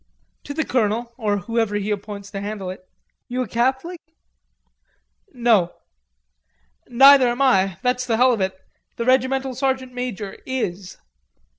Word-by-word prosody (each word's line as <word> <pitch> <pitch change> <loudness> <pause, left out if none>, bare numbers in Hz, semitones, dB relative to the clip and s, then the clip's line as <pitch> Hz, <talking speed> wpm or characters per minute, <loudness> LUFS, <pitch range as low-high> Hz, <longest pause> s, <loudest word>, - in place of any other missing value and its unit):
"To 285 - -6
the 315 -1 -1
colonel, 235 0 -1
or 210 -4 -1
whoever 225 +2 -1
he 205 +1 -2
appoints 205 0 -5
to 195 - -5
handle 200 -2 -5
it. 185 0 -13 0.4
You 250 +1 -2
a - - -7
Catholic?" 265 - -1 1.3
"No." 230 - +2 1.1
"Neither 270 +1 +7
am 240 +3 0
I. 195 -8 +3
That's 250 0 0
the 225 -2 +1
hell 250 +1 +5
of 220 - -2
it. 190 0 -2 0.4
The 235 - -3
regimental 260 +1 +1
sergeant 260 0 -2
major 230 -5 -5
is." 195 -8 -4
235 Hz, 140 wpm, -22 LUFS, 205-260 Hz, 1.3 s, Neither